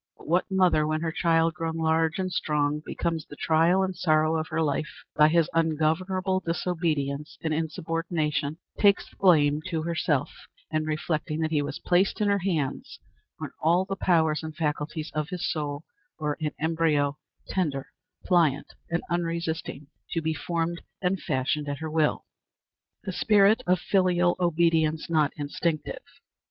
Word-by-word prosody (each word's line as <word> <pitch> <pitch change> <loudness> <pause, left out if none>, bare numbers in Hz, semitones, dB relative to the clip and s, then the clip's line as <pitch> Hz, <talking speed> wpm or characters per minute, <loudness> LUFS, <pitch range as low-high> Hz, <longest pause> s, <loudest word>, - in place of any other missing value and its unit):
But - - -15
what 175 +3 +2
mother, 180 -5 +3
when 155 0 -1
her 165 -1 -1
child, 165 -1 +2
grown 165 -2 -3
large 160 0 +1
and 185 -1 -2
strong, 150 -2 0
becomes 165 -1 -2
the 145 - -10
trial 165 +5 +3
and 190 -1 -2
sorrow 155 -2 +2
of 160 0 -1
her 155 - -2
life 150 0 -1 0.3
by 150 0 +6
his 165 0 +3
ungovernable 165 +4 +1
disobedience 160 -5 -2
and 160 -1 0
insubordination, 160 -2 -2 0.2
takes 200 -1 +4
the - - -20
blame 150 -5 +4
to 165 -3 -2
herself 170 0 0 0.4
in 155 0 0
reflecting 155 0 -2
that 160 0 0
he 150 -2 +2
was 145 0 -4
placed 180 +2 +1
in 210 -1 +2
her 200 0 +2
hands 165 -8 -2 0.4
when - - -6
all 175 +4 +3
the 195 0 -3
powers 160 -5 +2
and 160 -1 -7
faculties 155 0 -3
of 155 +1 -2
his 180 -2 -3
soul 145 -2 -3 0.4
were 150 -1 -1
in 155 -1 -1
embryo, 155 -3 +1 0.3
tender, 145 -8 -2 0.3
pliant, 155 -6 +2 0.2
and 170 +1 -1
unresisting, 165 -4 -2 0.3
to 165 - +1
be 160 0 -1
formed 170 +1 -2 0.2
and 180 0 0
fashioned 145 +3 -1
at 140 - -3
her 160 +1 -5
will? 155 -1 +1 0.8
The 190 - -3
Spirit 205 +2 +4
of 180 +1 +4
filial 180 -2 +2
Obedience 165 -2 +1
not 155 -3 +3
Instinctive. 150 +2 -2
160 Hz, 155 wpm, -26 LUFS, 155-175 Hz, 0.8 s, by